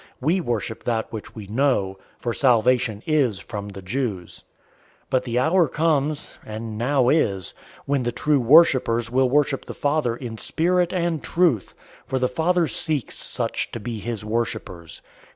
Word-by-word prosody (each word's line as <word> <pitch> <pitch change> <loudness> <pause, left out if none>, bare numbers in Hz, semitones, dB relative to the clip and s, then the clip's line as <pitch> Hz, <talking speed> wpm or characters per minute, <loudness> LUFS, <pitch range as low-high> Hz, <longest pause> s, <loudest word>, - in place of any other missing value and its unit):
We 165 +8 +1
worship 115 - -3
that 115 -1 -1
which 110 - -7
we 110 -3 -7
know; 105 -4 0 0.2
for 120 - -3
salvation 120 -4 +2
is 140 -10 +2
from 100 +1 -6
the 100 -1 -9
Jews. 105 -4 -4 0.6
004:023 - - -38
But 130 - +2
the 120 -1 -2
hour 165 +6 +3
comes, 150 -2 -1
and 110 0 -6
now 125 +2 +2
is, 100 - +1 0.3
when 140 -1 +1
the 120 -1 -1
true 145 +4 +1
worshippers 125 -4 +4
will 130 0 +3
worship 140 0 +1
the - - -8
Father 145 -5 0
in 115 -3 -7
spirit 175 +1 +1
and 170 -4 -1
truth, 165 - +1 0.3
for 130 - -1
the 130 0 +2
Father 165 +6 +1
seeks 150 -4 -2
such - - -2
to 115 - -4
be 115 0 -5
his 110 -1 -5
worshippers. 105 -7 -4
125 Hz, 160 wpm, -23 LUFS, 110-150 Hz, 0.6 s, worshippers